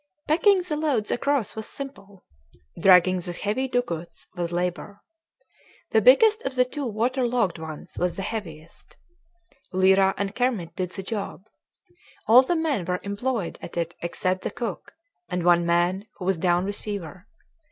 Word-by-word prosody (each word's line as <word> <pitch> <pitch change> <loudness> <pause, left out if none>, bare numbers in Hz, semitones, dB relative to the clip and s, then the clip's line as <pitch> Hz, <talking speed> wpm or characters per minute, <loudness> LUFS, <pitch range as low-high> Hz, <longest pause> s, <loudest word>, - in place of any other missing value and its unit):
Packing 365 +4 +4
the 325 -4 -3
loads 280 -9 0
across 275 -3 0
was 220 -1 -5
simple. 205 -9 -9 0.5
Dragging 185 -1 +6
the 175 0 -4
heavy 215 +9 -2
dugouts 205 -10 -3
was 175 -2 -3
labor. 180 +3 -3 0.9
The - - +4
biggest 450 -3 +6
of 270 - -4
the 250 0 +4
two 280 +1 -4
water 240 +4 0
logged 225 -9 0
ones 160 -2 -8
was 180 0 0
the 195 - -4
heaviest. 170 -7 -8 0.7
Lyra 190 +1 +4
and 200 0 -2
Kermit 220 -10 -1
did 185 -1 -2
the 195 +1 -7
job. 200 -2 -5 0.8
All 230 +4 +8
the 305 +7 -1
men 305 - 0
were 180 +1 -1
employed 200 -1 -3
at 170 - -8
it 170 0 -1
except 185 +2 -1
the - - -2
cook, 240 -2 -6 0.4
and 180 -1 -2
one 175 0 +4
man 175 +4 +1
who 180 - -7
was 190 -2 +1
down 175 +1 +2
with 205 +1 -4
fever. 195 -2 -6
200 Hz, 160 wpm, -25 LUFS, 175-250 Hz, 0.9 s, All